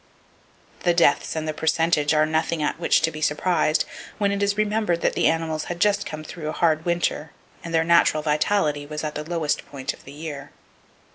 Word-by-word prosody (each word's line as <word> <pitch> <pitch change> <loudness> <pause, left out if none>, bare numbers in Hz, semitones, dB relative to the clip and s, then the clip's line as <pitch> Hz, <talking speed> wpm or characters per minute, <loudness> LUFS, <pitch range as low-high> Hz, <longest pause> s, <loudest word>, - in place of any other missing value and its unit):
The 175 -1 +1
deaths 165 -3 +3
and 160 0 -3
the 155 - -1
percentage 160 -1 +1
are 155 -1 +4
nothing 160 0 -1
at 150 - -1
which 175 - +3
to 160 0 +1
be 155 - -8
surprised, 155 +1 +1 0.3
when 200 -1 +1
it 200 0 -2
is 200 0 +1
remembered, 210 -5 0
that - - +1
the - - +2
animals 160 -1 -1
had 175 0 -5
just 200 +2 +2
come 155 0 -6
through 155 0 -6
a - - -3
hard 160 -2 +1
winter, 170 -3 -1 0.3
and 170 - -6
their 165 -1 +3
natural 165 -2 +3
vitality 150 -1 +1
was 150 +1 -5
at 155 -1 -3
the 150 - -4
lowest 155 -2 -1
point 140 -1 -4
of - - -17
the 135 - -12
year. 145 -2 -7
160 Hz, 205 wpm, -23 LUFS, 150-170 Hz, 0.3 s, are